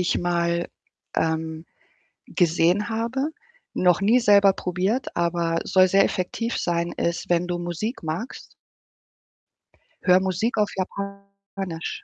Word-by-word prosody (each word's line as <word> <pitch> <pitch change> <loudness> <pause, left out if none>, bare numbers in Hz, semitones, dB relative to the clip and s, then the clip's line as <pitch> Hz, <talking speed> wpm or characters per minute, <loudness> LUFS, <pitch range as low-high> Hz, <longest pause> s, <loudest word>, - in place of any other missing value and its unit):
ich 180 - +1
mal, 170 -1 0 0.5
ähm, 160 0 -1 0.6
gesehen 175 +4 +2
habe, 235 +6 -1 0.4
noch 180 0 +3
nie 225 +6 +4
selber 200 -3 +6
probiert, 190 +9 -2
aber 170 -1 0
soll 185 0 +4
sehr 195 +2 +4
effektiv 230 +6 -2
sein, 170 0 -1
ist, 170 0 -2
wenn 175 0 +2
du 175 -1 -2
Musik 175 - -4
magst 165 +11 -5 1.5
höre 180 0 +5
Musik 190 +5 -1
auf 210 -1 +2
Japanisch 200 -2 -6
180 Hz, 115 wpm, -24 LUFS, 170-200 Hz, 1.5 s, selber